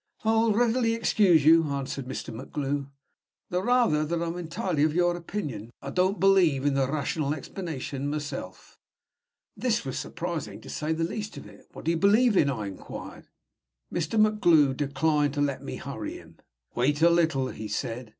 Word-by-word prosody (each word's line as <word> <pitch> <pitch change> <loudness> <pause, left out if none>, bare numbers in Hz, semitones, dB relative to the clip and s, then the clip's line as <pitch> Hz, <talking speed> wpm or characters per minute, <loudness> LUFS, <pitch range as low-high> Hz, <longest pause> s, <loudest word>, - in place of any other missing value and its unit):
"I'll 225 0 +3
readily 230 +1 +2
excuse 190 -9 +3
you," 165 +1 +7
answered 140 -2 -4
Mr. 130 -2 -5
MacGlue; 140 +3 -3 0.6
"the 180 +1 0
rather 235 -9 +3
that 165 +2 -1
I'm 170 0 -2
entirely 170 -2 -2
of 155 0 +1
your 175 0 +3
opinion. 150 - -5
I 140 - -7
don't 185 +5 +1
believe 180 -8 +4
in 145 - +3
the 135 -1 +1
rational 150 0 -1
explanation 145 -4 -5
myself." 150 0 -6 0.8
This 235 - 0
was 130 - -3
surprising, 165 - -5
to - - -10
say 155 +1 -2
the 160 +1 0
least 210 +5 -4
of - - -9
it. 105 -1 -16
"What - - -10
do 165 - +2
you 170 - 0
believe 210 +6 +4
in?" 145 -6 +4
I 115 -6 -3
inquired. 100 -1 -9 0.7
Mr. 175 +6 0
MacGlue 170 -10 +4
declined 145 +1 +1
to 145 - 0
let 140 -2 0
me - - -6
hurry - - -6
him. - - -16 0.4
"Wait 145 +5 +1
a 170 - +8
little," 160 -6 +2
he 110 - -6
said. 115 +3 -4
155 Hz, 170 wpm, -27 LUFS, 140-185 Hz, 0.8 s, a